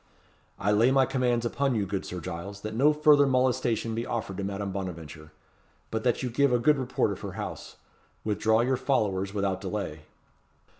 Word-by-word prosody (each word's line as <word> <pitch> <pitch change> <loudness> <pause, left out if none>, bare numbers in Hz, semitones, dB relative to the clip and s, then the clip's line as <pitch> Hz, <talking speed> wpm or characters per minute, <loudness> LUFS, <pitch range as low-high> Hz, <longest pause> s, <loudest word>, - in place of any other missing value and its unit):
"I 100 - 0
lay 110 +4 +4
my 135 0 +4
commands 125 -3 0
upon 135 +2 0
you, 105 -3 0
good 95 0 -4
Sir 90 - -5
Giles, 95 +3 -7
that 110 +1 -5
no 140 +7 +4
further 150 -1 +5
molestation 125 -3 +1
be 115 +1 -2
offered 110 -6 -4
to 100 - -3
Madame 100 0 -3
Bonaventure, 80 -5 -7 0.6
but 110 0 -2
that 125 0 +1
you 125 - -2
give 140 +2 +3
a 125 - +4
good 145 +4 +3
report 130 - 0
of - - -6
her - - -6
house. - - -6 0.5
Withdraw 110 +1 +2
your 130 +2 +1
followers 105 -8 0
without 100 -2 -1
delay." 95 -6 -4
110 Hz, 185 wpm, -27 LUFS, 100-130 Hz, 0.6 s, further